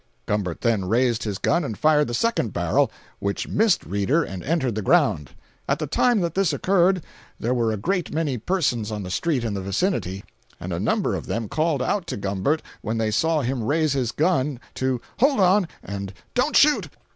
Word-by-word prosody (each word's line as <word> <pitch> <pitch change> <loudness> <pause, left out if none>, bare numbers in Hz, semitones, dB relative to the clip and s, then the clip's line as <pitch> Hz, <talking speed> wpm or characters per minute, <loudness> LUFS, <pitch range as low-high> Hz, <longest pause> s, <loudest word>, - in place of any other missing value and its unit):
Gumbert 95 -5 -2
then 110 -6 +1
raised 120 +3 +1
his 100 -3 -2
gun 170 - +1
and 110 -8 -4
fired 150 -1 +3
the 120 - -2
second 225 - 0
barrel, 85 -1 +2 0.3
which 100 0 -2
missed 220 -2 +2
Reeder 115 +12 +1
and 95 -8 -6
entered 135 -6 0
the 110 - -2
ground. 75 -6 +2 0.4
At - - +2
the - - -3
time 240 -5 +2
that 170 -2 -1
this 195 -2 +2
occurred, 185 -2 +2 0.4
there 120 +3 0
were 115 -3 +1
a 110 - -2
great 180 - -1
many 150 -6 -1
persons 125 - 0
on 105 -1 -4
the 90 - -6
street 145 - 0
in 110 -3 -2
the 100 - -3
vicinity, 100 - -1 0.4
and - - -5
a - - -2
number - - 0
of - - -4
them 115 -1 -2
called 155 0 0
out 180 +5 -1
to - - -4
Gumbert, 100 +10 -1 0.2
when 110 +1 -2
they 110 -1 0
saw 160 +6 +2
him 130 -1 -2
raise 150 +4 +1
his 125 -4 0
gun, 150 -5 +1
to 130 -1 -1 0.2
"hold 275 0 +3
on," 190 0 +4 0.2
and 100 -1 -5 0.2
"don't 255 +5 +1
shoot!" 300 0 +4
130 Hz, 200 wpm, -23 LUFS, 105-170 Hz, 0.4 s, on